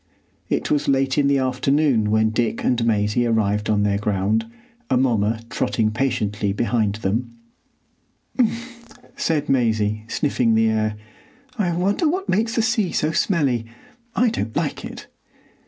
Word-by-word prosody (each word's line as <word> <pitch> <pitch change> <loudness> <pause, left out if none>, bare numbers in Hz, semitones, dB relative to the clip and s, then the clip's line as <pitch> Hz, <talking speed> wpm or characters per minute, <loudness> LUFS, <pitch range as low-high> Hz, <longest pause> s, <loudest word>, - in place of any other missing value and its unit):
It - - -1
was 145 - +1
late 135 0 +2
in 140 - +3
the 140 0 +3
afternoon 130 -2 +1
when 110 0 +2
Dick 115 0 -1
and 120 -2 +1
Maisie 110 +1 +1
arrived 105 -2 0
on 105 -1 +2
their 100 -1 +1
ground, 105 +2 0 0.4
Amomma 115 -4 +1
trotting 110 -2 0
patiently 105 -4 -1
behind 105 -1 0
them. 110 +3 -2 1.1
"Mf!" 240 0 -2 0.3
said 155 -3 -1
Maisie, 110 -5 +1
sniffing 120 -4 +1
the 110 0 +3
air. 110 -1 0 0.6
"I 180 -4 +1
wonder 200 - +1
what 375 +4 -2
makes 225 +4 0
the 230 - +2
sea 220 -6 +1
so 155 - 0
smelly? 140 - +1 0.5
I 245 0 +3
don't 115 - -4
like - - -2
it!" - - -8
120 Hz, 140 wpm, -22 LUFS, 110-150 Hz, 1.1 s, in